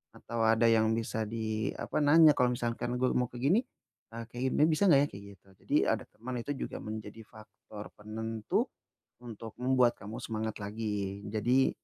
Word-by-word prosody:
atau 115 - -6
ada 110 +1 +4
yang 110 -1 +4
bisa 110 -1 -2
di 110 -1 -2
apa - - -2
nanya, 150 +1 +7
"Kalau 125 -3 +2
misalkan 120 0 -2
gua 130 0 +1
mau 125 -1 +1
kayak 120 0 -8
gini, 180 +10 +5 0.6
eh 115 - -5
kayak 120 +1 -7
ginian 150 - +3
bisa 195 +5 +3
nggak 140 -5 +7
ya?" - - -5
kayak 100 - -9
gitu. 95 - -32
Jadi - - -2
ada - - 0
teman 125 +4 -8
itu 145 - -5
juga - - -5
menjadi 110 0 -7
faktor 105 -1 -12
penentu 110 +1 -2 0.6
untuk 115 -2 -9
membuat 125 -1 +4
kamu 105 +3 -7
semangat 110 -1 -3
lagi. 100 -2 -3
Jadi, 120 +5 +2
115 Hz, 175 wpm, -31 LUFS, 110-125 Hz, 0.6 s, nanya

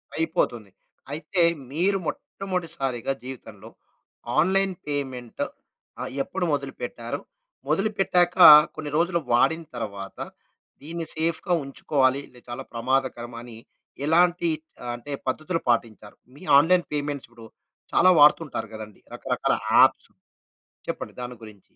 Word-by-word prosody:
అయిపోతుంది. 120 - -1 0.4
అయితే, 165 +4 -1 0.3
మీరు 185 +6 +2
మొట్టమొదటిసారిగా 165 - -3
జీవితంలో, 115 -6 -10 0.7
ఆన్‌లైన్ 190 +1 +2
పేమెంట్ 130 -5 -3 0.6
ఆహ్, - - -4
ఎప్పుడు 190 +4 -3
మొదలుపెట్టారు? 125 -4 -4 0.5
మొదలుపెట్టాక, 180 0 +2 0.4
కొన్ని 150 -2 -6
రోజులు 170 +1 +1
వాడిన 160 +7 +3
తర్వాత, 100 -4 -6 0.6
దీన్ని 165 +2 -5
సేఫ్‌గా 165 +3 0
ఉంచుకోవాలి, 135 0 +1
లె 125 - -16
చాలా 120 +3 -5
ప్రమాదకరమ 120 0 -1
అని, 120 -2 -11 0.5
ఎలాంటి 175 +1 +3 0.4
ఆహ్, 120 - -3
అంటే 120 +4 -9 0.2
పద్ధతులు 160 +5 -2
పాటించారు? 110 -3 -1 0.2
మీ 150 - -14 0.2
ఆన్లైన్ 175 +3 +3
పేమెంట్స్ 145 -3 -3
ఇప్పుడు 115 -1 -14 0.5
చాలా 185 - +6
వాడుతుంటారు 145 -7 +3
కదండి, 110 -1 -10
రకరకాల - - -1 0.2
యాప్సు - - +5 0.8
చెప్పండి - - -4
దాని 125 0 -6
గురించి? 105 -3 -12
140 Hz, 110 wpm, -25 LUFS, 120-170 Hz, 0.8 s, చాలా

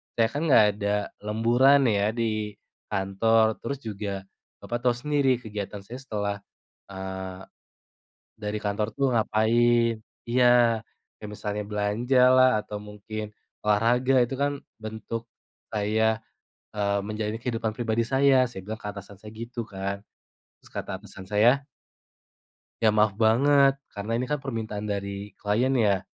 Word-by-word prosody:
saya 115 -1 +3
kan 145 - -3
enggak 115 -7 +7
ada 100 0 +1 0.2
lemburan 120 +6 +4
ya 100 0 +2
di 110 -3 -2 0.3
kantor, 110 +3 +2
terus 140 -1 -4
juga 100 -2 -4 0.4
Bapak 120 - -3
tahu 120 - +3
sendiri 140 0 +2
kegiatan 105 -3 -6
saya 120 +6 -9
setelah, 105 -6 -3 0.5
eee, 95 -1 -6 0.9
dari 105 0 -4
kantor 105 +1 -1
tuh 135 -1 +2
ngapain," 115 +1 +3 0.3
iya. 120 -1 +4 0.4
"Kayak 105 - -8
misalnya 105 0 -3
belanjalah 125 +5 +4
atau 105 0 -7
mungkin 105 +1 -7 0.3
olahraga. 120 +5 +3
Itu 125 +3 -3
kan 140 0 0 0.2
bentuk 110 +1 -6 0.4
saya, 110 +1 +1 0.5
eee, 100 -1 0
menjalani 110 +1 -3
kehidupan 115 -3 -2
pribadi 115 -1 0
saya," 135 0 +4
saya 95 -5 -8
bilang 110 +1 -5
ke 105 - -6
atasan 100 -1 -10
saya 105 0 -10
gitu 115 +1 -6
kan. 100 0 -4 0.6
Terus - - -18
kata - - -4
atasan 95 - -11
saya 120 +7 +4 1.2
"Ya 110 - +5
maaf 105 -1 +4
banget 135 +6 +4 0.2
karena 100 +2 -5
ini 125 - -1
kan 150 - +1
permintaan 110 -6 -4
dari 100 0 -4
klien 115 +6 +1
ya." 100 -5 +3
110 Hz, 135 wpm, -26 LUFS, 105-120 Hz, 1.2 s, enggak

